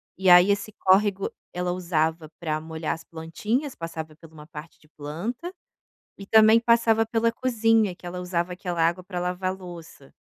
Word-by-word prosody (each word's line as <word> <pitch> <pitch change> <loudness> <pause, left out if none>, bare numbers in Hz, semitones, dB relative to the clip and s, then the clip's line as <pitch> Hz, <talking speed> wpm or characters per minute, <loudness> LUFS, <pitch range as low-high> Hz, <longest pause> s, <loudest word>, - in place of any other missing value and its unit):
e 190 0 +1
aí 180 +3 +8
esse 205 +1 -2
córrego 195 +1 +2 0.2
ela 180 0 -2
usava 160 -3 -1
para 155 -2 -2
molhar 160 0 -4
as 165 - -9
plantinhas, 210 - -3
passava 160 -2 -7
pela 160 0 -16
uma 150 -1 -12
parte 160 0 -11
de 155 - -24
planta, 185 - -6 0.7
e 195 - -9
também 220 +1 +6
passava 230 -1 +3
pela 230 +1 +1
cozinha, 225 -5 +2
que 180 - -16
ela 180 +1 -5
usava 180 0 -2
aquela 180 -2 -3
água 175 +2 -2
para 180 -1 -5
lavar 180 +1 -2
louça. 170 -6 -12
180 Hz, 170 wpm, -25 LUFS, 165-215 Hz, 0.7 s, aí